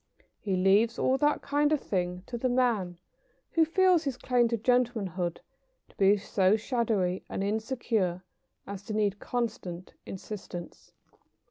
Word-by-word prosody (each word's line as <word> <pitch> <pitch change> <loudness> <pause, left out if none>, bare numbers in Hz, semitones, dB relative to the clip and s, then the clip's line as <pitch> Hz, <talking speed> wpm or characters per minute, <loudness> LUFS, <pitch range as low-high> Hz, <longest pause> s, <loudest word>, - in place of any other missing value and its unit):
He 195 -3 -1
leaves 200 +5 +3
all 265 +1 +2
that 295 0 +2
kind 290 +1 +1
of 305 - +3
thing 180 -4 -2
to 240 - -6
the 255 +2 0
man 230 -8 +1 0.5
who 330 - +4
feels 360 +1 +3
his 275 -4 -3
claim 245 -2 +2
to 230 0 -1
gentlemanhood 215 -8 0 0.5
to - - -23
be 200 +1 +4
so 195 0 +2
shadowy 215 -6 0
and 195 - -3
insecure 215 -4 -1 0.4
as 200 -1 -7
to 215 - -4
need 205 -1 0
constant 220 -7 -4
insistance. 190 -3 -8
215 Hz, 140 wpm, -29 LUFS, 190-250 Hz, 0.5 s, who